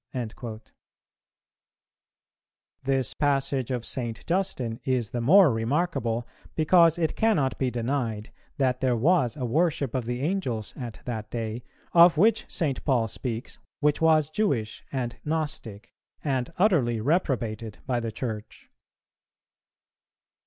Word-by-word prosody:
"[415:1] 115 -2 -6 2.1
This 135 -3 0
passage 140 -3 0
of 125 -3 -2
St. 120 -4 -4
Justin 130 -11 -1
is 125 -5 0
the 120 - -2
more 165 +3 +6
remarkable, 120 -1 -1 0.3
because 165 +1 +5
it 160 -3 0
cannot 170 -13 +1
be 130 - +1
denied 120 -3 -2 0.3
that 130 -3 +1
there 125 -2 +2
was 140 -2 +2
a 130 - -2
worship 145 -1 +1
of 130 -3 -1
the 120 +1 -3
Angels 140 - -2
at 120 -5 -7
that 110 -3 -4
day, 115 0 -4 0.3
of 170 -1 +7
which 220 +7 +3
St. 145 -7 -1
Paul 125 -6 +2
speaks, 115 +1 -5 0.2
which 150 +1 +2
was 155 -2 +4
Jewish 135 - -1
and 125 -3 -3
Gnostic, 145 -9 -3 0.3
and 135 -1 -1
utterly 150 - +3
reprobated 115 - -1
by 125 -2 0
the 115 -1 -3
Church. 110 -2 -6
130 Hz, 125 wpm, -26 LUFS, 115-155 Hz, 2.1 s, of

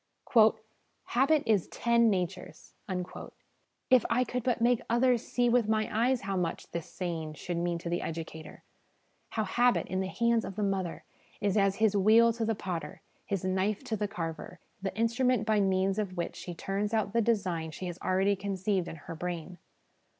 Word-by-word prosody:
' 220 0 -36
Habit 275 +4 +4
is 210 -6 +2
TEN 235 -1 +3
natures! 180 -2 -3 0.6
' - - -44
If 255 -3 +7
I 250 - +3
could 250 +1 -3
but 245 0 0
make 240 0 +3
others 240 0 +3
see 245 -1 +1
with 240 -2 +3
my 215 -1 +2
eyes 245 +2 +2
how 195 0 -3
much 175 -3 -3
this 170 -2 -4
saying 165 -4 -4
should 175 +2 -4
mean 170 0 0
to 170 - -7
the 175 +1 -1
educator! 160 -1 -7 0.7
How 220 - -1
habit, 240 +5 +2
in 185 - -2
the 190 - -1
hands 235 +3 +1
of 195 - -6
the 210 - -1
mother, 190 -4 -2 0.4
is 200 -2 0
as 195 -2 +3
his 215 -1 +2
wheel 225 +4 +5
to 225 0 -2
the 225 0 0
potter, 180 -4 -5 0.2
his 195 -2 -2
knife 190 +4 0
to 245 -4 -2
the 210 0 -1
carver 170 -2 -6 0.2
the 195 +1 -4
instrument 230 0 +2
by 215 -1 +2
means 195 0 +1
of 190 -4 -3
which 170 - -3
she 175 - -7
turns 200 +5 -2
out 210 -2 0
the 230 - +3
design 185 -8 0
she 160 +4 -7
has 175 -1 -5
already 190 +2 +2
conceived 190 -1 -1
in - - -6
her 150 +1 -9
brain. 175 +1 -5
200 Hz, 185 wpm, -30 LUFS, 180-230 Hz, 0.7 s, If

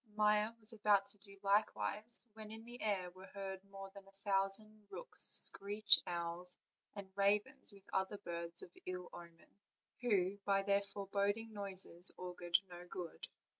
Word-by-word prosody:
Maia 210 0 +2
was 220 +1 -5
about 205 -2 +2
to 205 - -13
do 200 0 -16
so 195 0 -12
likewise, 215 +3 +2
when 215 -1 -10
in 225 +1 -10
the 240 +1 -10
air 190 -4 -1
were 185 +2 -14
heard 195 -1 -7
more 195 0 -10
than 195 -1 -13
a - - -18
thousand 200 +2 +2
rooks, - - +4
screech 205 +2 +5
owls, 175 +1 -5 0.4
and 200 -2 -9
ravens, 200 +2 0
with 200 -1 -17
other 190 +2 -1
birds 170 -2 -7
of 175 - -12 0.2
ill 180 -1 -6
omen, 170 +3 -14 0.4
who 200 -4 0
by 195 -1 +1
their 200 0 +2
foreboding 200 +2 -3
noises 190 -3 +2
augured 175 -1 0
no 175 0 -11
good. 175 -2 -8
200 Hz, 160 wpm, -37 LUFS, 185-210 Hz, 0.4 s, screech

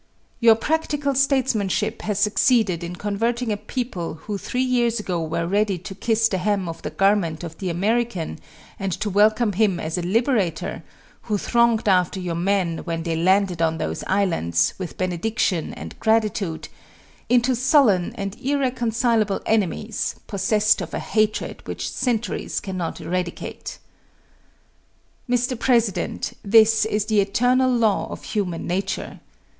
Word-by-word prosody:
Your 230 -2 +6
practical 295 +2 -1
statesmanship 255 -6 +1
has 210 -2 -2
succeeded 210 -3 +2
in 170 +1 -5
converting 225 +5 -1
a - - +1
people 205 - -4
who 200 +5 -6
three 250 +5 -1
years 240 -3 +1
ago 180 -5 -2
were 165 +1 -2
ready 200 +1 +1
to 185 +3 -8
kiss 225 +3 +1
the 190 -4 -2
hem 195 -1 0
of 165 0 -6
the - - -4
garment 195 -5 +1
of 165 -1 -8
the 190 - -2
American 200 0 -1 0.4
and 195 -1 -2
to 210 - -3
welcome 215 +2 +3
him 195 -3 +2
as 160 +2 -2
a - - -2
liberator, 195 - 0 0.5
who 210 - +2
thronged 235 0 +2
after 185 -1 +2
your 180 -2 -3
men, 175 -1 0
when 165 -1 -4
they 165 -1 -1
landed 185 +1 +2
on 160 0 +1
those 80 - -3
islands, 85 - +1
with 185 -3 -6
benediction 185 -1 -1
and - - -9
gratitude, 215 -6 0 0.6
into 245 +1 +3
sullen 245 - +3
and 195 0 -4
irreconcilable 240 -6 0
enemies, 215 0 -1
possessed 215 +2 +2
of - - -5
a - - -2
hatred 215 -1 -1
which - - -4
centuries 240 -2 -2
cannot 185 -4 -4
eradicate. 180 0 -4 1.5
Mr. 245 0 0
President, 235 -6 0
this 220 +1 +5
is 210 -1 0
the 215 -1 +2
eternal 250 +6 +2
law 225 -4 +2
of - - -8
human 190 -6 -3
nature. 185 +3 -3
205 Hz, 140 wpm, -23 LUFS, 180-230 Hz, 1.5 s, Your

